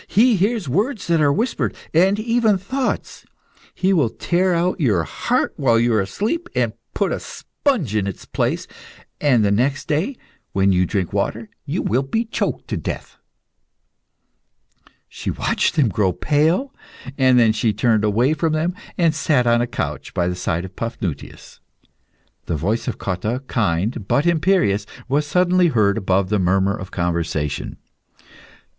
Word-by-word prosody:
He 235 +3 +4
hears 205 -1 0
words 205 - -1
that 170 -2 +2
are 145 -1 +4
whispered, 230 - -1 0.2
and 190 +5 +4
even 230 -2 +2
thoughts. 255 +8 -3 0.5
He 190 +1 +2
will 150 -10 +3
tear 180 +9 0
out 180 +3 0
your 105 - +2
heart - - -1
while 115 -4 +3
you 120 0 +2
are 110 - +3
asleep, 230 - -2
and - - +1 0.2
put - - 0
a - - -1
sponge 205 - -2
in 100 -2 +1
its 95 - -6
place, - - -1 0.5
and 125 -7 +3
the 100 - +2
next 135 +7 0
day, 165 - 0 0.4
when 95 0 +3
you 90 -1 +2
drink 95 -2 -2
water, - - -2 0.2
you - - -2
will 125 +5 +1
be 225 - -1
choked 225 - -3
to - - -1
death." - - -6 1.9
She - - -6
watched - - 0
them 145 -6 +4
grow 95 -2 +1
pale, 160 - +1 0.4
then 125 -4 +5
she 110 0 +1
turned 110 0 +1
away 115 +7 +2
from 155 +1 0
them, 160 +3 0 0.2
and 165 -3 +3
sat 145 -5 +1
on 120 0 +3
a 120 - 0
couch 120 - -5
by 85 - +1
the 90 - -1
side 90 0 -2
of 95 - -11
Paphnutius. 115 - -6 0.9
The - - -1
voice 105 - -1
of 125 - -2
Cotta, 105 +7 -3
kind 105 -1 -1
but 145 - +2
imperious, 165 - +2 0.2
was 145 +3 0
suddenly 180 +2 +3
heard 105 -9 +2
above 95 -2 0
the 105 -1 +1
murmur 95 +2 +2
of 95 -3 -8
conversation. 85 -4 -2
125 Hz, 160 wpm, -21 LUFS, -, 1.9 s, then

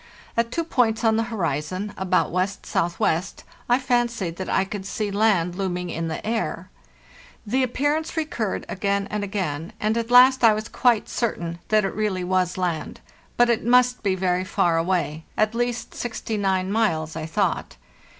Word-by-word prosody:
At 230 0 +1
two 335 - -1
points 240 -7 +1
on 220 -1 +4
the 225 - +2
horizon, 185 0 -2
about 185 -1 +1
W.S.W., 175 -3 0 0.5
I 245 - +5
fancied 240 -9 0
that 190 - -5
I 190 - +2
could 195 0 -6
see 210 0 -2
land 200 -5 +2
looming 180 -2 -3
in 165 0 -3
the 160 - -5
air. 225 +1 -2 0.7
The 250 +6 +1
appearance 290 +6 0
recurred 240 -10 -2
again 200 +1 -1
and 210 -1 -2
again, 175 -6 -3
and 215 +1 +1
at 230 0 -4
last 255 +1 +7
I 225 -2 +7
was 215 0 -4
quite 240 -4 +2
certain 170 -8 -2
that 215 -2 +3
it 195 - -2
really 205 -4 -1
was 185 0 0
land; 175 -4 -2 0.4
but 240 - +5
it 230 - 0
must 250 +1 +4
be 195 -3 +1
very 180 -1 0
far 180 -3 +1
away—at 175 +4 -1
least 240 0 -2
69 200 -5 -2
miles, 160 -8 0
I 160 -1 -4
thought. 160 - -1
200 Hz, 160 wpm, -24 LUFS, 180-230 Hz, 0.7 s, last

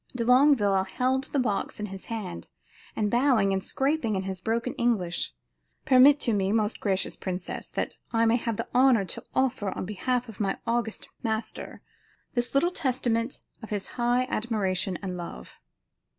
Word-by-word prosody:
De 235 -2 -1
Longueville 250 -7 +5
held 255 +7 0
the - - -3
box 215 -7 -1
in 210 - -2
his 195 -1 -8
hand, 210 - -5 0.5
and 210 -1 0
bowing 240 -6 +3
and 190 0 -1
scraping 270 -3 0
said - - -3
in 190 - -2
broken 230 +1 -1
English: 200 -8 0 0.5
"Permit 275 +1 +7
to 235 - 0
me, 195 -1 +1
most 215 0 +1
gracious 195 -2 0
princess, 185 -1 -5
that - - -3
I 230 -1 +3
may 230 +1 +4
have 230 -3 -2
the - - -3
honor 250 -5 +5
to 180 - -5
offer 250 -6 +1
on - - -4
behalf 245 +6 -1
of 220 -4 -11
my 195 -2 0
august 230 -1 -1
master, 220 -1 -4 0.5
this 245 +2 -2
little 345 +6 +3
testament 245 -5 -1 0.2
of 220 - -9
his 205 -2 -2
high 245 +1 +1
admiration 195 -6 -1
and 185 -2 -3
love." 175 -1 -8
225 Hz, 165 wpm, -27 LUFS, 195-250 Hz, 0.5 s, Permit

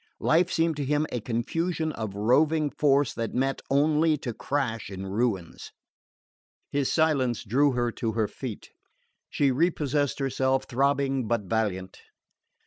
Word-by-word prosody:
Life 175 +3 +2
seemed 165 -2 +1
to 145 - -2
him 150 +2 +1
a 120 - -2
confusion 160 +9 -2
of 110 -7 -5
roving 145 +8 +2
force 140 -4 +2
that 115 -1 -4
met 135 +2 0
only 150 +3 +3
to 125 -4 -5
crash 125 -5 -2
in 95 -1 -6
ruins. 100 -4 -2 1.0
His 140 -2 0
silence 140 -8 +1
drew 135 +6 +2
her 120 -1 0
to 115 -1 -3
her 110 -1 +1
feet. 110 +1 -8 0.6
She 140 -2 +2
repossessed 145 -1 0
herself, 135 -1 0
throbbing 135 -1 0
but 115 -1 +1
valiant. 95 -2 -2
135 Hz, 135 wpm, -27 LUFS, 115-150 Hz, 1.0 s, only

